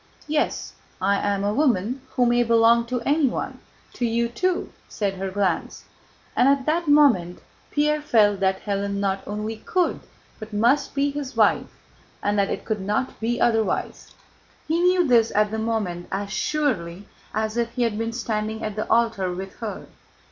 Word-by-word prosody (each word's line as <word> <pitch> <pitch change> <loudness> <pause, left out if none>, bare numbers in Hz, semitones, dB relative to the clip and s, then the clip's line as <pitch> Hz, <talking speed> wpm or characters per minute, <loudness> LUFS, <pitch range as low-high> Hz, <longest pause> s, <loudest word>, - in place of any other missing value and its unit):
Yes, 300 0 -1 0.3
I 200 +2 +2
am 200 -1 -1
a 205 +1 0
woman 250 -2 +1
who 250 - +3
may 240 0 +3
belong 230 0 +4
to 250 0 -2
anyone—to 280 -2 -2
you 235 0 +1
too," 365 +9 -1 0.2
said 200 -2 -2
her 190 0 -4
glance. 190 -3 -2 0.5
And 260 - +4
at 275 -1 +2
that 330 +2 0
moment 260 -13 +4 0.3
Pierre 300 +1 +1
felt 210 -8 +3
that 190 0 0
Hélène 200 -1 -1
not 195 -1 -1
only 210 +2 -4
could, 360 +10 0 0.4
but 215 0 -9
must, 240 +9 +2
be 285 0 +1
his 280 -2 -6
wife, - - +3 0.5
and 205 0 +1
that 195 - +2
it - - -4
could 215 -3 -2
not 210 +7 -2
be 235 +2 -1
otherwise. 225 -2 0 0.5
He 325 +2 +1
knew 360 -1 +3
this 235 -3 +4
at 210 0 +3
that 220 - -2
moment 210 -6 -2
as 200 +1 -3
surely 205 - -1 0.3
as 220 0 -1
if 235 -1 0
he 250 - 0
had 230 -3 0
been 225 0 -2
standing 220 -2 -3
at 215 -2 -3
the 215 - -3
altar 225 -5 +2
with 190 +2 -7
her. 225 -3 -6
225 Hz, 170 wpm, -24 LUFS, 200-255 Hz, 0.5 s, belong